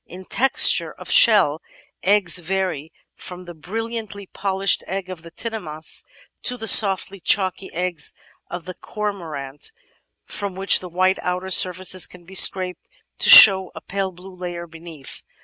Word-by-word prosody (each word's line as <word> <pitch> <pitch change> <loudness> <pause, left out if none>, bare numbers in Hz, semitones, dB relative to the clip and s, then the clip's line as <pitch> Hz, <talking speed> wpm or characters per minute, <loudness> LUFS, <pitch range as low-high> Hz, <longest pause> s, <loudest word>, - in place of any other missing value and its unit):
In 185 +2 -12
texture 270 +7 +3
of - - -10
shell, 190 -9 +4 0.4
eggs 190 -3 +2
vary 180 -4 -4 0.2
from 180 0 -11
the 175 - -10
brilliantly 215 +4 -6
polished 195 +1 -1
egg 190 0 -6
of 180 -3 -9
the 165 - -13
Tinamous 165 -6 -2 0.4
to 250 - +1
the 225 - -6
soft 195 -2 +5
chalky 190 -1 0
eggs 180 -1 -3 0.3
of 175 -1 -8
the 185 - -8
Cormorant, 165 - -6 0.5
from 200 -3 -6
which 195 +1 +2
the 180 - -10
white 185 +2 0
outer 180 +1 -4
surface 185 0 +2
can 175 -1 -17
be 190 - -15
scraped 185 -1 +1 0.3
to - - +3
show 190 -3 +8
a - - -9
pale 195 0 -4
blue 185 +2 -14
layer 175 -1 -7
beneath. 165 -4 -11
185 Hz, 150 wpm, -20 LUFS, 175-195 Hz, 0.5 s, show